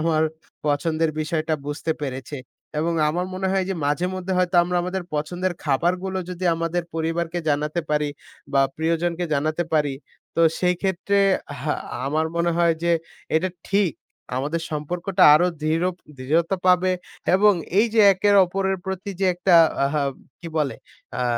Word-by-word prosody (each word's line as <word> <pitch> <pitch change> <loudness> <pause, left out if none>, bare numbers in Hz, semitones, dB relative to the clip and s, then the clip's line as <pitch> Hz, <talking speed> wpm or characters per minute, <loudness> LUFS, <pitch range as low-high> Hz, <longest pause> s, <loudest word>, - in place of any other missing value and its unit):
আমার 160 -1 +2 0.4
পছন্দের 155 +2 +1
বিষয়টা 155 0 -1
বুঝতে 145 +2 -2
পেরেছে, 135 0 -5 0.4
এবং 165 +2 0 0.2
আমার 175 +4 -1
মনে 190 +1 -2
হয় 190 -1 +1
যে 195 - -1
মাঝে 150 +5 +1
মধ্যে 185 0 -3
হয়তো 180 0 +1
আমরা 180 +1 -1
আমাদের 180 +1 -3
পছন্দের 175 +5 -1
খাবারগুলো 180 +6 0
যদি 180 0 -5
আমাদের 165 +1 -1
পরিবারকে 165 +1 -1
জানাতে 150 +3 0
পারি, 150 0 +1 0.4
বা 135 - +4 0.2
প্রিয়জনকে 170 +2 0
জানাতে 155 +4 0
পারি, 145 -3 +2 0.4
তো - - +2 0.2
সেই 180 0 +2
ক্ষেত্রে 195 +1 0 0.4
হ্যাঁ, 150 +2 -2 0.3
আমার 155 +3 0
মনে 170 0 +2
হয় 170 -1 +4
যে 170 - +2 0.4
এটা 175 +4 +2 0.2
ঠিক। 195 -4 +2 0.4
আমাদের 150 +5 -1
সম্পর্কটা 175 +5 -1
আরো 175 +4 +4 0.2
দৃঢ় 165 +3 +1 0.3
দৃঢ়তা 165 +8 +1
পাবে 185 0 +4 0.4
এবং 205 +2 +6 0.3
এই 225 - +5
যে 225 - +5
একে 195 +2 0 0.2
অপরের 190 +2 -1
প্রতি 190 +1 -4
যে 195 - +3
একটা 180 +1 +2 0.3
আহা 145 +1 0 0.4
কি 170 - -7
বলে? 145 -3 0 0.4
অ্যা 125 - -2
170 Hz, 150 wpm, -23 LUFS, 155-180 Hz, 0.4 s, এবং